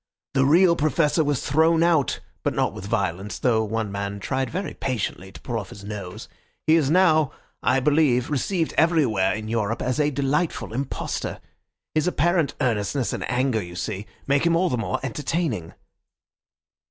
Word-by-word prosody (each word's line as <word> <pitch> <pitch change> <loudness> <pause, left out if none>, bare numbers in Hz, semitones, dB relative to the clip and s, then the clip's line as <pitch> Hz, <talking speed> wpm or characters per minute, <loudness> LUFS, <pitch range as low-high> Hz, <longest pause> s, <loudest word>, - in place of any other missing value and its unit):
The 135 -1 +3
real 170 +3 +5
Professor 155 0 +2
was 145 -3 -1
thrown 160 +3 +4
out, 165 -6 +2 0.2
but - - -1
not - - +1
with 95 - -7
violence, 100 -2 -2
though 115 -3 +2
one 110 -1 -2
man 100 0 -4
tried 130 +6 -2
very 190 +2 -4
patiently 100 -6 -3
to - - -12
pull 120 -3 -3
off 95 - -8
his 100 - -11
nose. 100 -3 -7 0.4
He 155 - +4
is 150 -5 +2
now, 155 -4 +4 0.3
I 130 +2 +3
believe, 145 -3 +2
received 165 +4 0
everywhere 130 - +3
in 110 0 -6
Europe 110 0 -1
as 125 +3 -1
a 150 -1 +3
delightful 145 -1 -1
impostor. 135 +3 -3 0.5
His 155 +2 +1
apparent 175 -1 +1
earnestness 115 +1 0
and - - -4
anger, 125 -3 +1
you 90 -2 -9
see, 95 +3 -4 0.2
make 140 0 +2
him 170 0 +3
all 180 +2 +2
the - - +1
more 115 - -2
entertaining." 130 - -2
130 Hz, 165 wpm, -24 LUFS, 110-155 Hz, 0.5 s, real